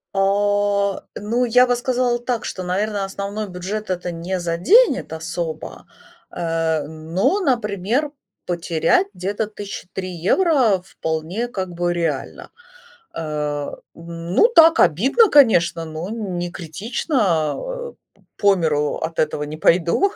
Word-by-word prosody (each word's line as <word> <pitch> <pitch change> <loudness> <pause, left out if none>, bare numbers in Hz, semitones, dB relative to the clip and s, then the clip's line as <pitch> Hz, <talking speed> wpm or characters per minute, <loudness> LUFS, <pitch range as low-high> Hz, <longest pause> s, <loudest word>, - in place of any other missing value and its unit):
А. 200 0 +1
Ну, 235 +4 0
я 250 +2 +5
бы 245 - +2
сказала 245 -1 0
так, 240 -1 -3
что, 185 - -5
наверно, 200 +3 -1
основной 200 +2 -5
бюджет 190 +4 -5
это 180 -1 -2
не 175 +3 -3
заденет 255 - +3
особо, 160 0 -5 0.5
э, 165 -2 -1
но, 160 - -1
например, 240 - 0 0.3
потерять 170 +1 +1
где-то 200 +4 -3
тыщи 205 -3 -8
три 185 -1 -4
евро 220 - +2
вполне, 165 +5 -3
как 190 -6 -4
бы, 175 0 -1
реально. 165 -5 -3 0.6
Э, 150 -2 -3 0.2
ну 170 - +1
так, 330 0 +7
обидно, 270 - +4
конечно, 175 - +4
но 160 +3 -6
н 210 -5 -4
не 175 0 -3
критично. 185 - -1
А, - - -6
э, - - -23 0.2
п - - -29
по 200 -1 +4
миру 150 -4 0
от 160 +1 -5
этого 150 -1 0
не 150 +1 -6
пойду. 175 - +3
190 Hz, 130 wpm, -21 LUFS, 165-230 Hz, 0.6 s, так